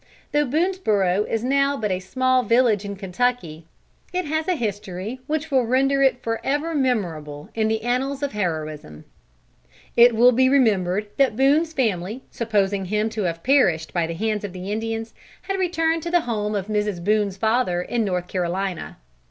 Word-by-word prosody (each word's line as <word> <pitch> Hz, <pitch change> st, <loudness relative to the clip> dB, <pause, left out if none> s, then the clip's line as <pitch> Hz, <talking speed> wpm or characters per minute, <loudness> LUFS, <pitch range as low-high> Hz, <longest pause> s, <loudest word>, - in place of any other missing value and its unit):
Though 295 Hz, -1 st, +2 dB
Boonesborough 220 Hz, -, +1 dB
is 225 Hz, 0 st, -1 dB
now 275 Hz, +2 st, +2 dB
but 210 Hz, -5 st, -2 dB
a 185 Hz, -, 0 dB
small 255 Hz, +7 st, +1 dB
village 230 Hz, -3 st, +3 dB
in 200 Hz, 0 st, -5 dB
Kentucky, 190 Hz, -5 st, -2 dB, 0.4 s
it 365 Hz, -1 st, -2 dB
has 315 Hz, +2 st, -2 dB
a 365 Hz, -, +2 dB
history 205 Hz, -, -4 dB
which 315 Hz, 0 st, -2 dB
will 260 Hz, -2 st, +3 dB
render 270 Hz, +3 st, +2 dB
it 265 Hz, -2 st, +2 dB
forever 285 Hz, +8 st, -1 dB
memorable 170 Hz, -, -2 dB
in 220 Hz, -1 st, 0 dB
the 220 Hz, 0 st, -1 dB
annals 265 Hz, +4 st, -1 dB
of 280 Hz, -, -1 dB
heroism. 155 Hz, -, -4 dB, 0.9 s
It 235 Hz, 0 st, +7 dB
will 245 Hz, +3 st, +6 dB
be 260 Hz, +2 st, +3 dB
remembered 210 Hz, -7 st, +2 dB
that 270 Hz, -5 st, +3 dB
Boone's 295 Hz, +6 st, +3 dB
family, 220 Hz, -, -1 dB
supposing 200 Hz, -4 st, 0 dB
him 210 Hz, +3 st, 0 dB
to 215 Hz, -3 st, -3 dB
have 165 Hz, -1 st, -3 dB
perished 190 Hz, -, +2 dB
by 170 Hz, -2 st, 0 dB
the 165 Hz, -, -5 dB
hands 215 Hz, +2 st, -1 dB
of 200 Hz, -3 st, -5 dB
the 185 Hz, +2 st, -6 dB
Indians, 225 Hz, +1 st, -3 dB, 0.3 s
had 390 Hz, -1 st, -3 dB
returned 330 Hz, -3 st, +1 dB
to 340 Hz, -, -4 dB
the 350 Hz, 0 st, +3 dB
home 215 Hz, -5 st, -2 dB
of 195 Hz, -2 st, -2 dB
Mrs. 210 Hz, -4 st, -2 dB
Boone's 205 Hz, -1 st, +1 dB
father 220 Hz, -4 st, +1 dB
in 235 Hz, +4 st, -1 dB
North 180 Hz, -3 st, -2 dB
Carolina. 185 Hz, 0 st, -3 dB
220 Hz, 170 wpm, -23 LUFS, 190-265 Hz, 0.9 s, It